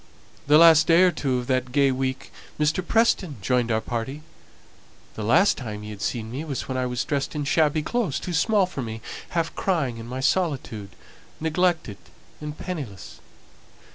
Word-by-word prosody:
The 150 +1 +7
last 165 -1 +7
day 170 +2 +6
or 185 - +5
two 135 -6 -1
of 125 - -3
that 130 -1 -1
gay 140 0 +3
week 130 0 -3 0.3
Mr. 150 +4 +1
Preston 195 -7 +2
joined 120 +4 +1
our 110 - +2
party. 125 +7 -4 0.9
The - - -7
last 120 - +4
time 105 -5 -6
he 105 - -7
had 100 -1 -9
seen 115 -1 -3
me 135 +5 -4
was 145 -5 -4
when 130 - -3
I 130 0 0
was 125 0 -2
dressed 140 +1 -2
in 150 - -1
shabby 155 +1 +2
clothes 205 - -1
too 180 - -5
small 200 +4 +3
for 180 -6 -6
me, 110 -2 -5 0.4
half 165 -1 0
crying 150 -11 -1
in 115 - -8
my 130 +2 -5
solitude, 130 - -1 0.5
neglected 160 - 0 0.4
and 150 0 -6
penniless. 140 - -7
140 Hz, 175 wpm, -24 LUFS, 125-165 Hz, 0.9 s, The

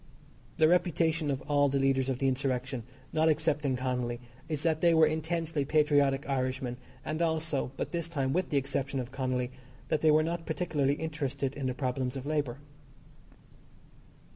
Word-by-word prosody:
The 155 - +6
reputation 165 -2 +2
of 135 -1 -2
all 145 -1 +3
the 140 - +1
leaders 135 -1 +2
of 130 - 0
the 135 - +1
insurrection, 130 -1 -1 0.3
not 160 +1 +3
excepting 150 -3 +1
Connolly, 125 -2 -2 0.3
is 155 -2 -2
that 160 -2 +1
they 170 -1 +5
were 160 0 +7
intensely 160 0 -1
patriotic 145 -2 +3
Irishmen, 130 -2 -1 0.3
and 155 +2 -2
also, 160 -5 0
but - - -3
this 170 -2 -2
time 135 -5 -1
with 185 +2 0
the 145 - +1
exception 135 0 -1
of 125 0 -5
Connolly, 130 -2 -1 0.4
that 155 - +1
they 160 - +5
were 155 +1 +5
not 165 +1 -3
particularly 150 -4 0
interested 140 -4 -3
in 140 -2 -3
the 130 - -2
problems 130 -1 -2
of 135 0 -5
labour. 145 -5 -1
145 Hz, 165 wpm, -30 LUFS, 130-160 Hz, 0.4 s, were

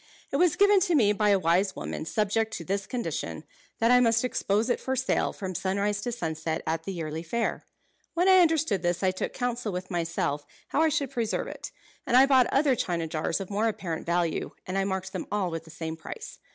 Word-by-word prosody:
It - - +1
was 355 -3 +4
given 405 0 +5
to 355 -2 +2
me 210 -7 +4
by 210 0 +2
a 200 - +5
wise 185 +2 +2
woman, - - -5
subject 215 +4 0
to 165 - -6
this 195 +2 -2
condition, 245 -2 -4 0.3
that 230 +1 +3
I 250 - +7
must 230 -1 +3
expose 215 -2 0
it - - 0
for 265 - -2
sale 260 +1 +1
from 190 -2 -5
sunrise 200 +3 -1
to 245 - -2
sunset 160 -6 -3
at 160 +1 -2
the 195 - -3
yearly 160 -3 -4
fair. 230 +8 -2 0.5
When 350 +2 +3
I 375 -1 +8
understood 315 - +3
this 175 +1 -1
I 185 - +4
took 185 - -3
counsel 245 -3 -2
with 185 +1 -5
myself 165 -4 -1 0.3
how 295 - +1
I 320 - +4
should 280 -3 -1
preserve 230 -3 -1
it; - - -7 0.4
and 245 - +4
I 265 - +8
bought 265 -3 +5
other 275 -2 +3
china 170 -6 -1
jars 160 +2 -1
of 195 0 -6
more 210 +3 +1
apparent 175 -8 -4
value, 170 -2 0
and 185 - -4
I 195 0 +1
marked 190 -1 -3
them 185 - -4
all 200 -4 0
with 165 0 -5
the - - -14
same 160 0 -5
price. 160 - -9
200 Hz, 220 wpm, -27 LUFS, 175-245 Hz, 0.5 s, I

